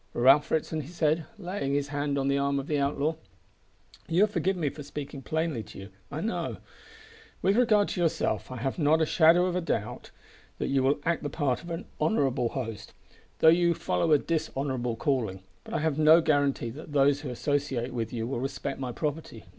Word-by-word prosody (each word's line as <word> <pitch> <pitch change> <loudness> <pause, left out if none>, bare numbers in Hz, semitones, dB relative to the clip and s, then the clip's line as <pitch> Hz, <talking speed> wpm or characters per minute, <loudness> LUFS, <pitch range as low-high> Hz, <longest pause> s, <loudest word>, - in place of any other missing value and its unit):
"Ralph 135 +4 +5
Ritson," 160 0 -1
he 140 - -10
said, 160 -1 0
laying 180 -8 -3
his 145 0 -1
hand 145 0 -1
on 135 0 0
the 140 0 +2
arm 140 0 +1
of 135 - -5
the 150 -1 0
outlaw, 145 +3 0 0.9
"you'll 175 +5 +4
forgive 190 -2 -1
my 155 -5 0
speaking 140 -1 -7
plainly 160 -3 -2
to 105 - -12
you, 95 0 -9 0.2
I 150 +3 -4
know. 225 +4 -2 0.9
With 195 +2 +3
regard 220 -4 +3
to 180 - -2
yourself 165 -1 0
I - - -5
have 135 +7 -3
not 155 +1 +4
a 160 - +3
shadow 165 +2 +5
of 180 -1 -1
doubt 110 -9 -3 0.5
that - - -2
you 135 -1 +2
will 135 +2 +2
act 170 0 +1
the 145 - -3
part 135 -4 -1
of 170 - -10
an 165 +2 -4 0.2
honourable 135 - +1
host, 115 -5 -6 0.5
though 160 - +8
you 170 +1 +4
follow 90 - 0
a 150 - +7
dishonourable 135 -6 -2
calling. 115 -8 -1 0.2
But - - -7
I - - +1
have 155 -2 0
no 155 +2 +7
guarantee 145 -6 +1
that 150 +3 -10
those 140 0 +3
who 145 - -5
associate 130 -1 -2
with 115 -2 -3
you 115 -2 -3
will 120 0 -3
respect 135 +1 -4
my 130 -2 -3
property. 150 -5 -4
145 Hz, 195 wpm, -28 LUFS, 135-160 Hz, 0.9 s, though